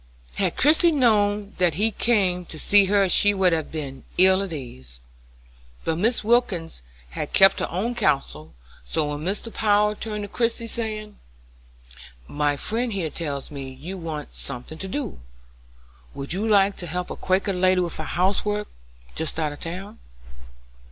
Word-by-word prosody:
Had -, -, -1 dB
Christie 320 Hz, +4 st, +5 dB
known 210 Hz, -7 st, +2 dB
that 175 Hz, -4 st, +3 dB
he 215 Hz, +5 st, +1 dB
came 195 Hz, -6 st, +1 dB
to 160 Hz, -, -10 dB
see 200 Hz, +5 st, +4 dB
her 200 Hz, 0 st, +3 dB
she 205 Hz, +2 st, +4 dB
would 185 Hz, -3 st, +3 dB
have 160 Hz, -2 st, -2 dB
been 140 Hz, -4 st, -6 dB
ill 190 Hz, +1 st, +5 dB
at 195 Hz, -3 st, -4 dB
ease; 65 Hz, -, -8 dB, 0.8 s
but 160 Hz, -, 0 dB
Mrs. 220 Hz, +8 st, +1 dB
Wilkins 205 Hz, -, +1 dB, 0.3 s
had -, -, -5 dB
kept 195 Hz, 0 st, +6 dB
her -, -, -2 dB
own 205 Hz, +8 st, -2 dB
counsel, 80 Hz, -, -1 dB, 0.3 s
so -, -, -1 dB
when 145 Hz, 0 st, -4 dB
Mr. 200 Hz, +7 st, -3 dB
Power 210 Hz, 0 st, +3 dB
turned 210 Hz, -1 st, -5 dB
to -, -, -5 dB
Christie, 230 Hz, +2 st, -1 dB
saying: 215 Hz, -2 st, -4 dB, 1.1 s
"My 145 Hz, -1 st, 0 dB
friend 230 Hz, -, -1 dB
here 170 Hz, -6 st, -2 dB
tells 145 Hz, -5 st, -4 dB
me 135 Hz, -2 st, -6 dB
you 145 Hz, +9 st, -8 dB
want 160 Hz, -5 st, -6 dB
something 140 Hz, +4 st, -7 dB
to 195 Hz, -, -5 dB
do. 145 Hz, -, -4 dB, 1.0 s
Would 140 Hz, +3 st, -3 dB
you 205 Hz, +5 st, -1 dB
like 200 Hz, -2 st, +4 dB
to 175 Hz, -, -6 dB
help 180 Hz, +2 st, -4 dB
a -, -, -4 dB
Quaker 195 Hz, +2 st, 0 dB
lady 185 Hz, 0 st, +3 dB
with 175 Hz, -2 st, -3 dB
her 155 Hz, -, -3 dB
housework, 205 Hz, +5 st, 0 dB, 0.4 s
just 160 Hz, 0 st, -3 dB
out 150 Hz, -2 st, -1 dB
of 145 Hz, -, -12 dB
town?" 190 Hz, +6 st, -7 dB
185 Hz, 165 wpm, -24 LUFS, 155-210 Hz, 1.1 s, kept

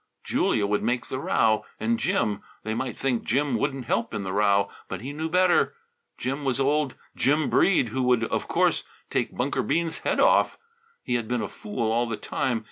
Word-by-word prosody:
Julia 105 Hz, -, +1 dB
would 105 Hz, +1 st, 0 dB
make 125 Hz, 0 st, 0 dB
the 130 Hz, -, -4 dB
row. 110 Hz, -5 st, +2 dB, 0.2 s
And 235 Hz, 0 st, 0 dB
Jim. 175 Hz, -, 0 dB, 0.2 s
They 110 Hz, -, -2 dB
might 125 Hz, 0 st, -3 dB
think 130 Hz, -4 st, 0 dB
Jim 140 Hz, +4 st, +1 dB
wouldn't 135 Hz, -3 st, -1 dB
help 115 Hz, 0 st, -1 dB
in 105 Hz, -, -2 dB
the 95 Hz, -1 st, -4 dB
row, 100 Hz, -1 st, +3 dB, 0.2 s
but 95 Hz, -1 st, -5 dB
he 135 Hz, +4 st, -5 dB
knew 160 Hz, +2 st, -3 dB
better. 180 Hz, -, +3 dB, 0.4 s
Jim 135 Hz, +3 st, -3 dB
was 135 Hz, -2 st, 0 dB
old 145 Hz, 0 st, +1 dB, 0.2 s
Jim 150 Hz, +2 st, +2 dB
Breede, 170 Hz, -11 st, +4 dB
who 130 Hz, +5 st, -2 dB
would 125 Hz, -2 st, +3 dB
of -, -, -2 dB
course -, -, +2 dB, 0.3 s
take -, -, -1 dB
Bunker -, -, 0 dB
Bean's 165 Hz, +6 st, 0 dB
head -, -, -1 dB
off. -, -, +4 dB, 0.5 s
He -, -, -2 dB
had 120 Hz, -2 st, 0 dB
been 120 Hz, 0 st, -1 dB
a -, -, -2 dB
fool 110 Hz, +2 st, -3 dB
all 120 Hz, +1 st, +1 dB
the 110 Hz, -, -2 dB
time. 125 Hz, -4 st, -1 dB
125 Hz, 200 wpm, -26 LUFS, 110-145 Hz, 0.5 s, Breede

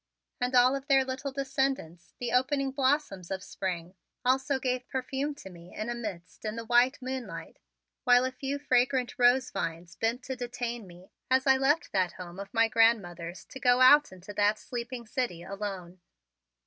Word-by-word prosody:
And 250 Hz, +1 st, 0 dB
all 250 Hz, +2 st, +6 dB
of 275 Hz, 0 st, -6 dB
their 270 Hz, -2 st, +4 dB
little 265 Hz, +2 st, -4 dB
descendants, 265 Hz, -, -2 dB
the 245 Hz, -1 st, -2 dB
opening 270 Hz, +2 st, +1 dB
blossoms 265 Hz, -, 0 dB
of 190 Hz, 0 st, -4 dB
spring, 180 Hz, -2 st, -4 dB, 0.3 s
also 265 Hz, +2 st, +2 dB
gave 255 Hz, -1 st, -2 dB
perfume 270 Hz, +3 st, -2 dB
to 195 Hz, -, -11 dB
me 170 Hz, 0 st, -14 dB
in 215 Hz, +3 st, -3 dB
a -, -, -1 dB
mist 205 Hz, -7 st, -7 dB
in 215 Hz, 0 st, -3 dB
the 230 Hz, 0 st, -5 dB
white 245 Hz, +3 st, +4 dB
moonlight, 260 Hz, -1 st, -6 dB, 0.4 s
while 245 Hz, 0 st, +5 dB
a 260 Hz, -, -1 dB
few 275 Hz, +2 st, -3 dB
fragrant 255 Hz, -2 st, +1 dB
rose 250 Hz, +1 st, +4 dB
vines 170 Hz, -2 st, -4 dB
bent 235 Hz, +3 st, -1 dB
to 260 Hz, 0 st, -4 dB
detain 240 Hz, -3 st, -4 dB
me 180 Hz, +1 st, -15 dB, 0.2 s
as 260 Hz, 0 st, +3 dB
I 265 Hz, -1 st, +5 dB
left 285 Hz, +5 st, +1 dB
that 185 Hz, -3 st, +1 dB
home 180 Hz, 0 st, -9 dB
of 200 Hz, 0 st, -7 dB
my 230 Hz, 0 st, +4 dB
grandmothers 195 Hz, -7 st, +1 dB
to 265 Hz, -, -10 dB
go 245 Hz, 0 st, +4 dB
out 290 Hz, +4 st, +7 dB
into 185 Hz, +2 st, -10 dB
that 205 Hz, +1 st, +2 dB
sleeping 240 Hz, +1 st, -6 dB
city, 225 Hz, -8 st, -3 dB
alone. 190 Hz, -2 st, -6 dB
245 Hz, 175 wpm, -29 LUFS, 195-265 Hz, 0.4 s, out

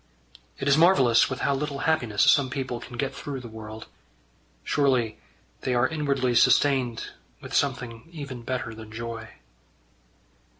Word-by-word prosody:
It 135 Hz, -, -4 dB
is 140 Hz, +2 st, +5 dB
marvellous 135 Hz, -9 st, +5 dB
with 130 Hz, -, -4 dB
how 140 Hz, -, +2 dB
little 140 Hz, +1 st, -3 dB
happiness 120 Hz, -10 st, +2 dB
some 140 Hz, -2 st, +5 dB
people 130 Hz, -3 st, -3 dB
can 120 Hz, 0 st, -10 dB
get 135 Hz, 0 st, -2 dB
through 140 Hz, -2 st, -6 dB
the 125 Hz, -, -9 dB
world. 110 Hz, 0 st, -9 dB, 0.8 s
Surely 130 Hz, -6 st, +1 dB, 0.4 s
they 125 Hz, -, -1 dB
are 120 Hz, +1 st, +3 dB
inwardly 140 Hz, -5 st, 0 dB
sustained 125 Hz, -1 st, +3 dB, 0.3 s
with -, -, -10 dB
something 125 Hz, -2 st, -1 dB
even 140 Hz, -7 st, -7 dB
better 120 Hz, -1 st, -3 dB
than 110 Hz, -1 st, -11 dB
joy. 115 Hz, 0 st, -6 dB
130 Hz, 140 wpm, -26 LUFS, 115-140 Hz, 0.8 s, is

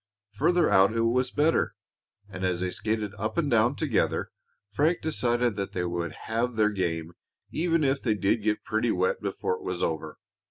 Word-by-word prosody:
Farther 170 Hz, +11 st, +2 dB
out 95 Hz, +2 st, +5 dB
it -, -, +2 dB
was 125 Hz, +2 st, +2 dB
better, 150 Hz, +4 st, +1 dB, 0.5 s
and 95 Hz, -2 st, -7 dB
as 90 Hz, -1 st, 0 dB
they 90 Hz, 0 st, -1 dB
skated 105 Hz, +1 st, -2 dB
up 110 Hz, +2 st, -3 dB
and 150 Hz, -5 st, +1 dB
down 120 Hz, +3 st, +3 dB
together 140 Hz, -9 st, 0 dB, 0.4 s
Frank 155 Hz, +10 st, +2 dB
decided 120 Hz, -7 st, 0 dB
that 100 Hz, -1 st, -3 dB
they 90 Hz, -, -1 dB
would 85 Hz, -2 st, -3 dB
have 115 Hz, +2 st, -1 dB
their 105 Hz, -1 st, +3 dB
game 85 Hz, -4 st, -2 dB, 0.4 s
even 165 Hz, -1 st, +1 dB
if 135 Hz, 0 st, +1 dB
they 110 Hz, -4 st, +1 dB
did 105 Hz, +2 st, +1 dB
get 105 Hz, 0 st, 0 dB
pretty -, -, 0 dB
wet 475 Hz, 0 st, 0 dB
before 455 Hz, -, -2 dB
it -, -, -14 dB
was 385 Hz, -, -3 dB
over. -, -, -3 dB
110 Hz, 185 wpm, -27 LUFS, 100-145 Hz, 0.5 s, out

